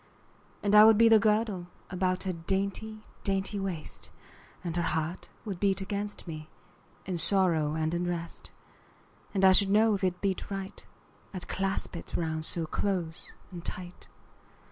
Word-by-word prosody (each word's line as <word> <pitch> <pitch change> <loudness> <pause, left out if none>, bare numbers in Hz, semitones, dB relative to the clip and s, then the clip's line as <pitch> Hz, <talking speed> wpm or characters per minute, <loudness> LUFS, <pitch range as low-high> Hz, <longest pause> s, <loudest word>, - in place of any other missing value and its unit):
And 205 0 +1
I 210 0 +10
would 220 -1 +7
be 230 +1 +7
the 220 -1 +7
girdle 210 -4 +1 0.2
About 185 0 0
her 190 -1 -1
dainty 200 +5 -3 0.2
dainty 195 +1 -1
waist, 185 -5 -5 0.5
And 170 -2 -3
her 175 - +1
heart 160 +1 -2 0.2
would 195 -5 -4
beat 195 -1 +2
against 200 0 -4
me, 155 -2 -7 0.6
In 180 -2 -2
sorrow 165 -5 +3
and 160 +1 0
in 175 +1 -1
rest: 170 -1 -4
10 - - -9 0.8
And 190 0 +4
I 190 - +9
should 195 +1 +6
know 215 +2 +5
if 200 - -2
it 180 -1 0
beat 195 -2 -2
right, 195 0 -5 0.5
I'd 185 - -6
clasp 195 -1 -2
it 170 - -7
round 160 -2 -2
so 165 0 +1
close 175 -1 -2 0.2
and 175 -2 -8
tight. 180 0 -7
190 Hz, 165 wpm, -29 LUFS, 170-200 Hz, 0.8 s, I